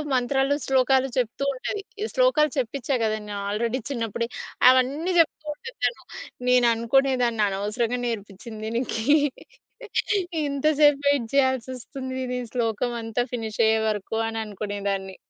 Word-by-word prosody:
మంత్రాలు, 270 +3 +2
శ్లోకాలు 265 0 +3
చెప్తుంటది, 275 - -2 0.3
శ్లోకాలు - - +3
చెప్పించా 260 +2 -1
కదా 215 0 +1
నేను 205 -1 -5
ఆల్రేడీ 230 +4 -1
చిన్నప్పుడే 230 -2 -2 0.4
అవన్నీ 280 +8 +1
చెప్తూ 310 -1 +2
ఉంటది. 465 +7 -10
తను - - -1 0.5
నేను 250 -1 +5
అనుకునే 265 +4 +2
దాన్ని 225 -3 +1
అనవసరంగా 220 +5 -1
నేర్పించింది 215 0 -6
దీనికి, 230 -1 -2 1.4
ఇంత 280 +1 -3 0.2
సేపు 290 -1 +6
వెయిట్ 285 -4 +3
చేయాల్సొస్తుంది 260 0 -1 0.2
దీని - - -1 0.2
శ్లోకం 235 0 0
అంతా 225 +2 -1
ఫినిష్ 220 -2 -4
అయ్యేవరకు 220 -1 0
అనే 225 0 -4
అనుకునేదాన్ని. 200 -2 -4
245 Hz, 120 wpm, -25 LUFS, 220-270 Hz, 1.4 s, సేపు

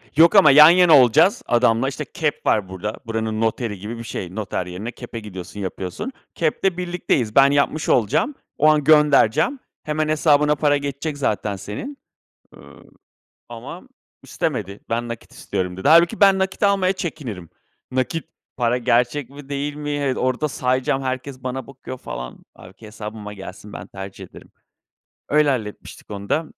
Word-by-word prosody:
Yok 165 +6 +6
ama 170 -8 +8
yan 150 +3 +9
yana 175 -4 +6
olacağız 130 - +4
adamla. 120 +1 +2
İşte, 145 +2 -6
KEP 155 -2 -3
var 100 -4 +1
burada. 100 +3 -5
Buranın 110 -1 -2
noteri 110 -2 -1
gibi 110 +4 -6
bir 115 - -7
şey. 95 -5 -6
Noter 100 -4 -3
yerine 90 +6 -6
KEP'e 120 -1 -8
gidiyorsun, 100 -1 -9
yapıyorsun. 95 - -5 0.2
KEP'te 170 +3 0
birlikteyiz. 175 -11 -1
Ben 135 0 +6
yapmış 145 +2 0
olacağım. 125 - +2 0.2
O 150 - +4
an 155 -1 +4
göndereceğim. 150 - +4 0.2
Hemen 155 0 -1
hesabına 150 -1 +3
para 145 0 +2
geçecek 140 +1 -4
zaten 105 -6 -1
senin. 180 - -7 0.6
Iıı, - - -16 0.6
ama - - -9 0.4
istemedi. 105 - -3
"Ben 120 +1 -1
nakit 115 -1 -8
istiyorum." 90 -1 -4
dedi. 95 - -1
Hâlbuki 170 +7 +5
ben 195 -1 +6
nakit 190 +2 -2
almaya 195 -2 +3
çekinirim. 125 - -6 0.4
Nakit 130 +5 -2 0.3
para 120 0 +1
gerçek 125 +3 +1
mi, 140 0 -12
değil 145 +1 -3
mi? 150 0 -5
Evet, 145 -3 -1
orada 130 +4 0
sayacağım 130 +1 0
herkes 130 0 -5
bana 130 +1 -4
bakıyor 130 -1 -9
falan. 60 0 -8
Hâlbuki 100 +4 -14
hesabıma 105 -1 -8
gelsin. 100 +1 -10
Ben - - -8
tercih 95 0 -9
ederim. - - -15 0.8
Öyle, 150 0 +4
halletmiştik 110 -4 -5
onu 100 0 -7
da. 160 +1 +1
130 Hz, 155 wpm, -21 LUFS, 110-150 Hz, 0.8 s, yan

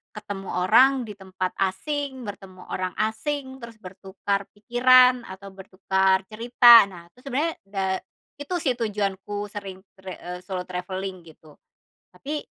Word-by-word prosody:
ketemu 200 -2 -7 0.2
orang 260 +4 +5
di 210 - -7
tempat 185 -1 -4
asing, 260 +7 -2
bertemu 190 -2 -10
orang 185 -1 -3
asing, 260 +5 -3
terus 230 -1 -10
bertukar 195 +1 -4
pikiran 250 +2 +5
atau 190 +1 -10
bertukar 190 0 0
cerita. 235 0 +7
Nah 175 -3 -12
itu 250 - -21
sebenernya 290 +5 -1
da 195 -1 -3 0.5
itu 290 +5 -4
sih 260 -4 +1
tujuanku 205 -2 -3
sering 195 -2 -7 0.2
tre 190 -1 -9
eee, 180 +1 -7
solo 185 -1 -4
travelling 185 +1 -5
gitu. 155 -1 -19 0.6
Tapi, 295 +2 -5
200 Hz, 135 wpm, -24 LUFS, 190-245 Hz, 0.6 s, cerita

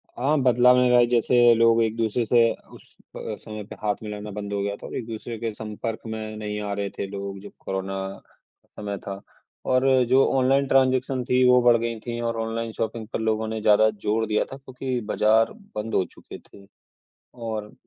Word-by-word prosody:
हाँ, 140 +5 0
बदलाव 125 0 +5
में 125 0 +4
रहा 125 0 +6
जैसे 120 0 +5
लोग 115 0 +4
एक-दूसरे 115 +1 0
से 115 +1 +4 0.2
उस - - -17 0.2
अ, - - -6 0.2
समय 110 -1 -7
पे 100 - -10
हाथ 105 -1 0
मिलाना 105 0 -6
बंद 100 0 -5
हो 100 - -1
गया 100 0 -2
था, - - -10
एक-दूसरे 115 0 -6
के 115 0 -2
संपर्क 110 +1 -5
में 110 -1 -5
नहीं 105 -1 -4
आ 105 -1 -4
रहे 100 0 -2
थे 100 - -3
लोग, 100 0 -6
जब 100 - -11
कोरोना 95 0 -4 0.3
का - - -35
समय 100 -1 -4
था 100 0 -5 0.5
और 130 +1 +3 0.2
जो 130 +1 +5 0.2
ऑनलाइन 135 +2 +3
ट्रांजेक्शन 130 -1 +2
थीं, 125 +1 +2
वो 125 0 +6
बढ़ 120 -1 +5
गईं 115 0 -3
थीं 120 -1 -4
और 115 -1 -2
ऑनलाइन 115 0 -3
शॉपिंग 110 0 -4
पर - - -1
लोगों 110 0 0
ने 110 0 -4
ज़्यादा 110 +1 +5 0.2
जोर 110 +2 +1
दिया 105 0 +1
था 135 - -9
क्योंकि 130 -1 -4
बजार 110 +1 +3 0.2
बंद 110 +1 -4
हो - - +3
चुके - - -12
थे 100 - -18 0.7
और 110 -3 -5
115 Hz, 195 wpm, -24 LUFS, 105-120 Hz, 0.7 s, रहा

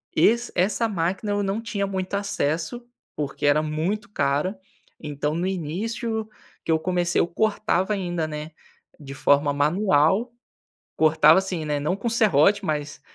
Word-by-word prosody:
Esse 235 +9 +3
essa 210 +5 +1
máquina 190 +3 -2
eu 205 0 0
não 200 +3 -2
tinha 220 -4 -2
muito 190 -1 -4
acesso, 170 +2 -2 0.3
porque 145 -1 -3
era 145 +1 +4
muito 175 +7 -2
cara, 150 +3 0 0.4
então 150 0 -3
no 175 +2 -1
início 215 - -3 0.4
que - - -1
eu 160 - +3
comecei 175 +1 +1
eu - - +1
cortava 210 0 0
ainda, 175 -5 -2
né, 150 +1 -6 0.5
de 140 -2 -9
forma 145 +1 +2
manual, 175 - +2 0.6
cortava 155 +1 +5
assim, 185 -4 -2
né, 150 -1 -1
não 150 +5 -1
com 235 - -3
serrote, 205 -3 +3
mas 150 -2 -3
175 Hz, 145 wpm, -24 LUFS, 150-205 Hz, 0.6 s, cortava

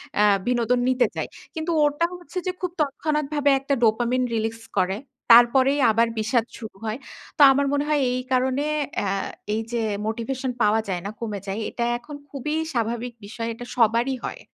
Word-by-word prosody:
অ্যা 210 - +4 0.2
বিনোদন 245 0 +2
নিতে 255 -1 +3
চাই। - - -2 0.3
কিন্তু 320 +2 -2
ওটা 295 +3 +1
হচ্ছে 355 +1 -10
যে - - +2
খুব 365 -2 -2
তৎক্ষণাৎভাবে 295 0 0
একটা 275 +1 -1
dopamine 240 +3 +2
রিলিজ 225 +1 -2 0.2
করে। 190 +1 +1 0.3
তারপরেই 260 +4 +6
আবার 230 +2 +3
বিষাদ 225 +1 +1
শুরু 220 -3 -9
হয়। 215 +1 -2 0.4
তো - - +2
আমার 280 +1 +2
মনে 285 0 +1
হয় 300 -2 +2
এই 250 - -1
কারণে 260 +2 +1 0.3
অ্যা 200 -2 0 0.4
এইযে 230 +1 -2 0.3
মোটিভেশন 250 +4 -2
পাওয়া 210 +1 +4
যায় 180 -2 -2
না, - - -2
কমে 215 -3 -4
যায়। 195 +3 -3
এটা 235 - -2
এখন 285 +5 -10
খুবই 295 +3 -3 0.2
স্বাভাবিক 235 +1 -2
বিষয়। 230 +2 -5
এটা 245 +2 -9
সবারই 235 +2 +3
হয়। - - -5
245 Hz, 170 wpm, -24 LUFS, 225-280 Hz, 0.4 s, তারপরেই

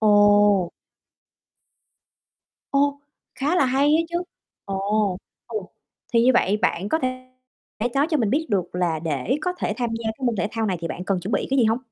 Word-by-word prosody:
Ồ! 205 -3 +5 2.0
Ô, 285 0 +1 0.3
khá 295 +6 0
là 275 - +4
hay 265 +2 +2
á 310 +3 +4
chứ! 345 +1 -2 0.4
Ồ! 200 0 0 0.3
Ừm, 215 -4 -4 0.5
thì 230 - +4
như 255 - +6
vậy 205 -3 +3
bạn 200 -2 0
có 320 - +1
thể 255 -1 -4 0.6
nói 280 +2 +3
cho 310 - +3
mình 225 -7 +1
biết 315 +6 +1
được 185 -4 -1
là 175 -3 0
để 155 - -1
có 360 - -1
thể - - -1
tham 240 -2 -1
gia 230 - -9
cái 220 +4 -3
môn 235 - 0
thể 195 +2 0
thao 225 -1 -1
này 185 -3 0
thì 165 - -3
bạn 180 +3 -5
cần 190 -2 0
chuẩn 200 +5 -5
bị - - 0
cái 270 - +2
gì 245 - +5
hông? 225 +2 +2
220 Hz, 195 wpm, -23 LUFS, 195-265 Hz, 2.0 s, như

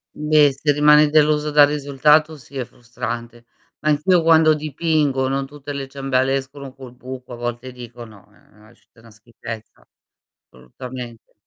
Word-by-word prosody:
Beh 150 -1 +3
se 145 +2 0
rimani 150 +1 +5
deluso 150 0 +2
dal 145 -1 +6
risultato, 150 +2 +2
sì 140 +1 -12
è 125 - -3
frustrante. 120 -1 -8 0.3
Ma 155 - -1
anch'io 165 +4 +3
quando 160 -1 +5
dipingo, 150 -3 -1
non 135 0 -2
tutte 145 0 -9
le 135 -1 -5
ciambelle 135 -1 -1
escono 135 0 -9
col 130 -3 -12
buco, 130 0 -10
a - - -6
volte 120 +1 -5
dico: 120 -1 -11
"No, 110 -4 -17
ehm, 105 +1 -24
ha 110 - -19
uscito 115 -1 -25
'na 115 - -17
schifezza". 110 0 -11 0.6
Assolutamente. 120 - -10
135 Hz, 155 wpm, -20 LUFS, 120-150 Hz, 0.6 s, dal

